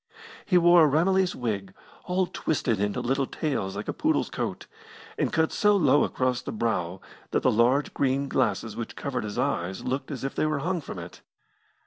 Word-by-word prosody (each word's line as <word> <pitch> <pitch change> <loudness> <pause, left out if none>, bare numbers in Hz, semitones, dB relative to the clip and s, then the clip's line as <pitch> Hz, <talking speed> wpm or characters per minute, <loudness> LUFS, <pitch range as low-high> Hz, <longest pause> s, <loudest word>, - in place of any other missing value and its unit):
He 180 - +4
wore 175 -1 +7
a - - +6
Ramillies 185 +5 +2
wig, 100 -6 -3 0.3
all 185 +1 +1
twisted 130 - -1
into 105 0 -1
little 135 +2 0
tails 120 -11 -2
like - - -5
a - - -2
poodle's - - 0
coat, - - -4 0.5
and - - 0
cut 160 0 +1
so 210 0 +3
low 145 -6 +4
across 130 -1 0
the - - -6
brow 95 -6 -2 0.3
that - - 0
the - - +4
large 125 +6 +2
green 140 +1 0
glasses 110 -5 0
which 115 - -6
covered 135 -4 -3
his 105 -1 -5
eyes 90 +2 -1
looked 130 +2 -2
as 135 -5 -5
if 135 - -2
they 155 - 0
were 155 -1 0
hung 175 +4 -1
from 120 - -8
it. 85 0 -9
135 Hz, 190 wpm, -26 LUFS, 110-160 Hz, 0.5 s, wore